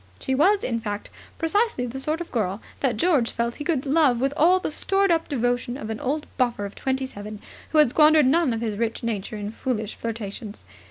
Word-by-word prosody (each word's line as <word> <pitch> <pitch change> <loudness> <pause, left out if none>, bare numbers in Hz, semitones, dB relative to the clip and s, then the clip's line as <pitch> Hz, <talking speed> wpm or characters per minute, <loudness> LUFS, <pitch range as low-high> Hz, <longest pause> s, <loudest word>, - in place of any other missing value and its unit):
She 265 - -1
was, 385 +9 +3
in 230 -2 -1
fact, 205 -2 -5 0.3
precisely 330 - +1
the 250 +2 -5
sort 305 +5 -1
of 345 - -7
girl 200 -4 -1 0.2
that 255 -6 0
George 290 -6 +2
felt 235 0 -2
he - - -5
could 300 -5 0
love 280 -4 +3
with 270 +2 0
all 355 +5 +5
the 370 - -3
stored 390 +4 +2
up 330 -1 +1
devotion 245 -1 -1
of 220 -4 -5
an 220 - -4
old 295 +4 -2
buffer 240 -5 0
of 200 - -7
twenty 265 0 -2
seven 210 -3 -8 0.3
who 315 - 0
had 300 -6 +6
squandered 305 0 +6
none 305 +1 +3
of 225 -1 -2
his 220 -3 -2
rich 230 +1 -2
nature 215 -2 -3
in 205 0 -4
foolish 225 -3 -3
flirtations. 220 -1 -6
255 Hz, 215 wpm, -24 LUFS, 225-305 Hz, 0.3 s, had